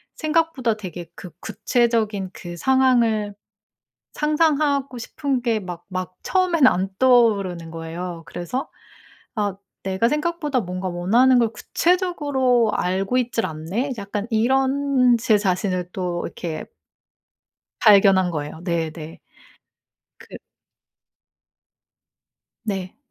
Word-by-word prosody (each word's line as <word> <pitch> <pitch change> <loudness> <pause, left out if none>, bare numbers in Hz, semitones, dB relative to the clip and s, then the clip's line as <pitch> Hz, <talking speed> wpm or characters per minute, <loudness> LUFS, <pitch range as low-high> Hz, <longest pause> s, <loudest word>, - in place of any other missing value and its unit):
생각보다 310 -7 0
되게 180 -4 -7
그 180 - -9
구체적인 220 -5 0
그 175 -1 -8
상황을 235 -4 +2 0.8
상상하고 300 -3 +1
싶은 265 +2 -2
게 230 -2 0
막 175 -3 -8
막 185 -1 -5
처음엔 355 -7 +3
안 190 -4 +1
떠오르는 200 -10 +3
거예요. 165 +1 -6
그래서 215 +10 -5 0.7
'아 205 -4 -1 0.3
내가 190 +4 +1
생각보다 300 -2 -1
뭔가 185 -1 -4
원하는 225 +9 +3
걸 230 -2 +2
구체적으로 285 - +1
알고 190 +7 0
있지를 235 -2 -1
않네?' 180 - -3
약간 205 +1 -4
이런 265 +2 +3
제 220 -2 +3
자신을 185 -2 -1
또 180 -2 -3
이렇게 165 -3 -5 1.2
발견한 195 -4 +5
거예요. 150 0 -5
네네. 165 -2 -4 1.0
그 - - -11 2.3
네. 195 -4 -4
215 Hz, 220 characters per minute, -22 LUFS, 180-260 Hz, 2.3 s, 발견한